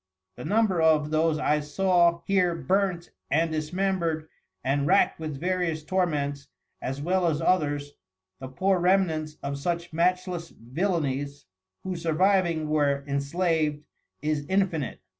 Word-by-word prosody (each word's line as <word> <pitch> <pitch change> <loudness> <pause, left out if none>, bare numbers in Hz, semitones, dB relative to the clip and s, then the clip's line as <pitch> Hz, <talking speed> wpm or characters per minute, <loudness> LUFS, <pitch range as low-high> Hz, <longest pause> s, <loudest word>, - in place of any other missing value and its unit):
The 125 - -8
number 205 -5 +2
of 155 -2 +3
those 155 0 +2
I 150 0 +1
saw 170 +2 +2
here 180 -3 +2
burnt, 185 -1 0 0.2
and 160 +4 +2
dismembered, 165 0 -1 0.4
and 140 +2 0
rackt - - +3
with 155 -4 -5
various 175 -3 -1
Torments, 145 -6 -1 0.3
as 135 +2 -4
well 180 +1 +1
as 155 -2 0
others, 145 -5 0 0.5
the 130 - -6
poor 185 +8 +1
Remnants 170 -4 +1
of 140 0 -3
such 170 +2 -3
matchless 175 0 0
Villanies, 140 - -2 0.4
who 185 -1 -3
surviving 170 -1 +1
were 145 -2 +1
enslaved, 150 +1 0 0.4
is 150 -1 0
infinite. 185 -7 0
160 Hz, 125 wpm, -26 LUFS, 150-180 Hz, 0.5 s, of